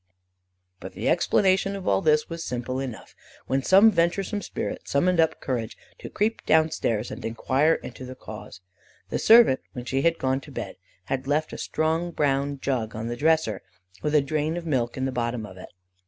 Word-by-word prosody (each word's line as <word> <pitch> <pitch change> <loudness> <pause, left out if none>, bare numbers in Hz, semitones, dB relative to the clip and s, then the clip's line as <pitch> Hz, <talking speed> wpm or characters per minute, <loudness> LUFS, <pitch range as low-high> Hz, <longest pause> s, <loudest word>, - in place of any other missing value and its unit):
But - - -9
the - - -4
explanation 195 0 +2
of 195 -1 -7
all - - +3
this 155 -3 +3
was 165 0 -6
simple 125 0 -3
enough, 130 -4 -7 0.3
when 135 +1 0
some 195 +9 +6
venturesome 190 +3 0
spirit - - -5
summoned 175 +5 +2
up 160 -1 +2
courage 120 -4 -3 0.2
to - - -8
creep 220 +2 -1
down 160 0 +4
stairs 115 -6 -1
and - - -7
enquire 130 +7 +1
into 125 - -9
the 130 0 -8
cause. 95 - -10 0.5
The - - -2
servant, 225 - +6
when 125 -1 -7
she 135 +1 0
had 165 +2 +2
gone 130 +1 0
to - - -13
bed, - - -6 0.3
had 135 +4 -3
left 155 +2 0
a - - -5
strong 160 +2 -1
brown 140 -3 0
jug 115 -6 -2
on 110 +1 -4
the 120 - -3
dresser, 160 -4 +1 0.4
with 150 +5 0
a 150 - +6
drain 155 +3 -1
of 175 - -6
milk 125 -6 -1
in 130 - -1
the 135 - -1
bottom 120 -2 -2
of 95 -3 -11
it. 90 - -10
140 Hz, 195 wpm, -25 LUFS, 125-165 Hz, 0.5 s, some